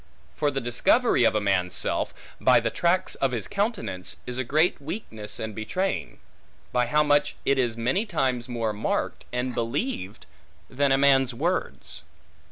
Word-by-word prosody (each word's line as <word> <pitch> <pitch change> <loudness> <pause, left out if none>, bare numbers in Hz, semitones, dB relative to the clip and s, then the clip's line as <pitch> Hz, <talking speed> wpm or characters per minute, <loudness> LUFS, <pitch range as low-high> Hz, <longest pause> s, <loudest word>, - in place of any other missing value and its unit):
For 145 - +1
the 135 -1 -2
discovery 125 - +3
of 115 - +3
a - - +3
man' 95 -3 +1
s 90 - -7
self, - - 0 0.3
by - - +5
the - - -1
tracts 180 +2 +1
of 135 -2 0
his 115 -4 -1
countenance, 200 - -2
is 125 0 -4
a - - +1
great 155 +6 +2
weakness 135 - -6
and 110 -1 -4
betraying; 180 - -2 0.5
by 125 -1 +1
how 150 +5 +3
much 145 0 +2
it 140 -1 +2
is 120 -3 0
many 155 - 0
times 130 - -1
more 115 -3 -1
marked, 105 +2 -2
and 125 +1 -2
believed, 115 - -3 0.5
than 140 +1 +2
a 135 - +5
man's 135 -2 +4
words. 170 +8 -3
130 Hz, 170 wpm, -26 LUFS, 115-150 Hz, 0.5 s, by